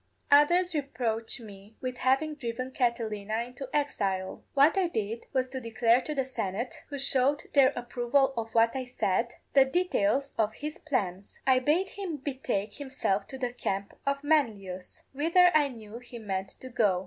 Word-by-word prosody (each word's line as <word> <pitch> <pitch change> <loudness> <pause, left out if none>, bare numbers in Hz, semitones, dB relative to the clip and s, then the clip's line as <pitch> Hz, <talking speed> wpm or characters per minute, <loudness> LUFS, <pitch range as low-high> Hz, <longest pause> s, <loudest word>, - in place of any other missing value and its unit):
_Others 345 +5 +5
reproach 235 -7 -2
me 205 0 -13
with 255 -1 -4
having 270 +4 +2
driven 255 -2 -4
Catilina 225 -4 -1
into 250 +2 -8
exile. 195 -10 -1
What 280 +5 +6
I 380 -2 +2
did 225 -6 -3
was 260 -1 +1
to 260 0 -5
declare 230 +1 +3
to 300 +3 -4
the 270 -2 0
Senate 230 -2 -4
who 285 - -4
showed 275 +1 +2
their 275 -2 +6
approval 245 +3 +1
of 225 -1 -3
what 230 +2 +4
I 265 - -1
said 235 -2 -1 0.2
the 275 - +8
details 275 - +1
of 215 0 +1
his 300 +4 -6
plans. 200 - -3
I 260 -1 +5
bade 320 +9 +2
him 375 -6 -5
betake 260 -7 -3
himself 260 -8 -1
to 265 - -7
the 250 -2 -2
camp 200 -4 -3
of 280 0 -1
Manlius, 210 -12 -1
whither 335 +5 +5
I 300 -2 +5
knew 225 -3 -9
he 245 0 -10
meant 195 -3 -3
to 260 - -8
go. 210 -7 +2
255 Hz, 170 wpm, -29 LUFS, 220-280 Hz, 0.2 s, the